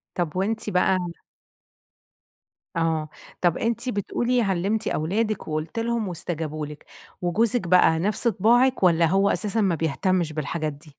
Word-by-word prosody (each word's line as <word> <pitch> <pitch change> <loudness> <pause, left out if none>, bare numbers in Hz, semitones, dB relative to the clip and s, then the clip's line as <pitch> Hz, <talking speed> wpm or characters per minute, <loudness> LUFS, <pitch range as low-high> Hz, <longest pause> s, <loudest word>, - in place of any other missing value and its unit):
طَب 175 -2 -2
وأنتِ 215 +3 -1
بقى 185 +1 +3 1.8
آه 160 -2 0 0.3
طَب 175 -2 +2
أنتِ 235 +2 -1
بتقولي 240 +4 0
علمتِ 195 +2 0
أولادك 205 +6 -1
وقُلتِ 155 +8 -3
لهم 230 -2 -1
وإستجابوا 160 -3 -4
لِك، 150 0 -11 0.4
وجوزِك 200 +3 +1
بَقى 165 -2 +5
نَفْس 210 +6 +1
طباعِك 235 +4 +3
والّا 170 -2 +5
هو 195 +4 +3
أساسًا 215 +1 0
ما 185 -4 +2
بيهتمش 165 +1 0
بالحاجات 155 0 -3
دي؟ 150 +2 -14
185 Hz, 130 wpm, -24 LUFS, 160-220 Hz, 1.8 s, بَقى